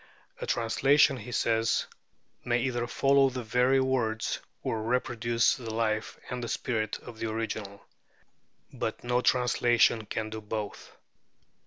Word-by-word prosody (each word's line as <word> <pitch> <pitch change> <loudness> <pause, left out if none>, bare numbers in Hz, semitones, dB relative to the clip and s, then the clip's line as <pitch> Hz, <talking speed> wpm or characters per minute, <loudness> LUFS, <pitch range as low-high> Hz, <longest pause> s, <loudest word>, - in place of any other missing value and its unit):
"A - - -4
translation," 135 +5 +3
he 120 +1 -8
says, 115 -1 +1 0.6
"may 120 0 +1
either 120 -2 -1
follow 135 +1 +4
the 125 -1 -5
very 125 +4 +3
words, 120 -4 0 0.2
or 110 - -1
reproduce 120 0 +1
the 115 -5 -6
life 110 -1 -1
and 125 -2 -3
spirit, 110 -4 -2
of 115 -2 -12
the 115 - -2
original; 110 -2 -4 0.9
but - - -4
no 125 0 +1
translation 120 -3 +3
can 110 -1 -3
do 110 0 -5
both. 105 -1 -6
115 Hz, 130 wpm, -29 LUFS, 110-125 Hz, 0.9 s, follow